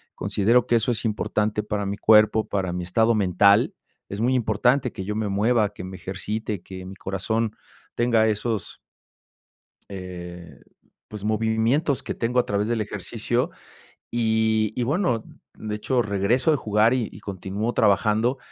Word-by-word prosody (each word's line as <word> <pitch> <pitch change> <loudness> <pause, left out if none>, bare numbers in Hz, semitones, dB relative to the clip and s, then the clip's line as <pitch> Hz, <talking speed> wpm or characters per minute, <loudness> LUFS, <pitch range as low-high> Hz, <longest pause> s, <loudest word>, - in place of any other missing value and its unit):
considero 115 +5 +2
que 120 - +3
eso 115 +2 +1
es 120 - -2
importante 105 0 -1
para 105 -1 -2
mi 100 +1 -3
cuerpo, 110 0 +4
para 95 -3 -2
mi 90 0 -3
estado 110 +6 +2
mental. 100 +1 +4 0.4
Es 100 +2 -4
muy 125 +2 +2
importante 125 +3 +2
que 95 - -5
yo 105 +1 -3
me 110 -1 -1
mueva, 105 +2 +2
que 90 - -8
me 95 0 -7
ejercite, 105 +1 -4
que 95 0 -9
mi 95 +1 -9
corazón 110 +4 -1 0.4
tenga 115 -2 +3
esos 110 -3 -2 1.1
eh, 90 -3 -8 0.5
pues 105 -2 -9
movimientos 110 +7 +1
que - - -4
tengo 125 +2 0
a - - +2
través 100 +1 -1
del 115 -2 0
ejercicio, 105 - -2 0.6
y 110 -2 +1
y 125 - 0
bueno, 130 - 0 0.3
de 105 -1 -4
hecho, 120 +4 0
regreso 105 +8 +1
de 150 - +2
jugar 110 +2 +2
y 120 -4 0
y 95 - -12
continúo 100 +4 -4
trabajando, 110 +4 +2
110 Hz, 155 wpm, -24 LUFS, 100-115 Hz, 1.1 s, cuerpo